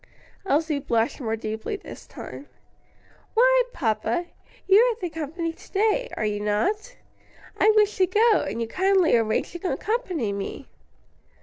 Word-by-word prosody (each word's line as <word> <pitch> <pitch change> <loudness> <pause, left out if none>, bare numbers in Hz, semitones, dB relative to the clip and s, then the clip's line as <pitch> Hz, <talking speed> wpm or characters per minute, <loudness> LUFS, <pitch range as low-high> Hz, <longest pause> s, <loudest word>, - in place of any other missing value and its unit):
Elsie 305 -2 +1
blushed 235 +2 0
more 225 -2 -1
deeply 220 - -4
this - - -11
time. 285 - -9 0.9
"Why, - - +5
papa, 225 - -1 0.4
you 390 +2 +7
are 480 0 +4
the 355 -5 -4
company 325 +2 -4
to - - -18
day, 440 +5 +1
are 215 - -1
you 210 -1 -1
not? 390 - -1 0.6
I - - +5
wished 425 0 +3
to 375 -2 +3
go, 435 +4 +4
and 210 +4 -4
you 230 - -2
kindly 375 - +3
arranged 220 -2 0
to 370 - -1
accompany 370 - -2
me." 200 +7 -6
335 Hz, 145 wpm, -25 LUFS, -, 0.9 s, you